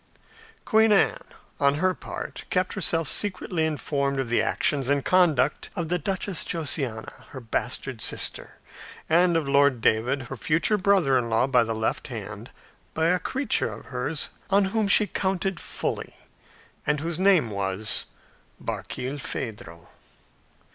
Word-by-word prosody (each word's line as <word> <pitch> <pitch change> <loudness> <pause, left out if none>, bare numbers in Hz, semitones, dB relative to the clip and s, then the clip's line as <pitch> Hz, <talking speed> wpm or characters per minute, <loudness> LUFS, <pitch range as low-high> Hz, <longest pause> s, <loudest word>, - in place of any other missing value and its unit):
Queen 220 0 +4
Anne, 200 - +3 0.4
on 140 0 +3
her 185 +4 +1
part, - - -7
kept 185 0 0
herself 165 -4 +1
secretly 180 -1 0
informed 140 -2 -1
of 130 -3 -2
the 120 - +2
actions 140 -3 0
and 140 -1 +1
conduct 155 -7 +2
of 170 -2 -3
the 180 +1 0
Duchess 190 +2 +1
Josiana, 135 -8 -3
her 135 - -8
bastard 115 -3 -3
sister, - - -2 0.5
and 170 +1 +4
of 155 -4 -2
Lord 140 -2 +3
David, 120 +5 +1
her 125 - -7
future 180 +5 +2
brother 185 -9 +3
in 115 -1 -3
law 115 +2 +2
by 125 -3 +3
the 115 0 -3
left 110 0 -2
hand, - - -7 0.5
by 160 +1 +2
a 180 +1 +2
creature 265 +9 0
of - - -10
hers, 140 +4 -3 0.2
on 200 0 +4
whom 220 -2 +1
she 210 +2 +5
counted 190 -3 -2
fully, - - -4 0.7
and 150 0 +1
whose 165 +1 -3
name 185 - +4
was 100 +2 +1 0.5
Barkilphedro. 115 - -6
150 Hz, 140 wpm, -25 LUFS, 130-185 Hz, 0.7 s, she